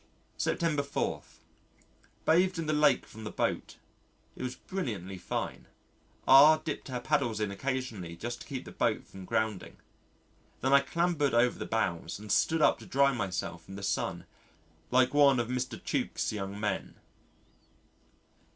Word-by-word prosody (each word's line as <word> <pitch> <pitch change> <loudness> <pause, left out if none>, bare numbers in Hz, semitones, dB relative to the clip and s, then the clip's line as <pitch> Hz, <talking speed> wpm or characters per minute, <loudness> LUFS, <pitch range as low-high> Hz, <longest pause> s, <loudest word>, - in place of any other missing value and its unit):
September 160 -4 +1
4. 140 0 -2 1.0
Bathed 180 +3 +3
in 165 - -2
the 155 - 0
Lake 150 -3 +4
from 110 +1 -11
the 105 - -4
boat. - - -2 0.6
It - - -9
was 125 0 -3
brilliantly 100 - -5
fine. - - -4 0.6
R 145 +4 +9
dipped 155 -1 -5
her 125 -2 -3
paddles 120 -5 0
in 105 -2 -1
occasionally 110 -6 -4
just 120 +6 -5
to - - -10
keep 135 -3 -5
the - - -9
boat - - 0
from 95 -1 -11
grounding. 105 -1 -2 0.8
Then 130 +2 +2
I 140 - +9
clambered 150 -1 0
over 120 +1 +3
the - - -4
bows 90 -7 -1
and 105 0 -7
stood 160 +8 +3
up - - +4
to - - -12
dry 140 +1 +3
myself 90 -6 -4
in 95 - -7
the 100 - -7
sun - - -2 0.6
like 130 +1 +3
one 140 -3 +5
of 120 0 -1
Mr. 125 -2 -3
Tuke's - - -2
young 100 -1 -4
men. 105 -2 -2
125 Hz, 155 wpm, -30 LUFS, 105-145 Hz, 1.0 s, R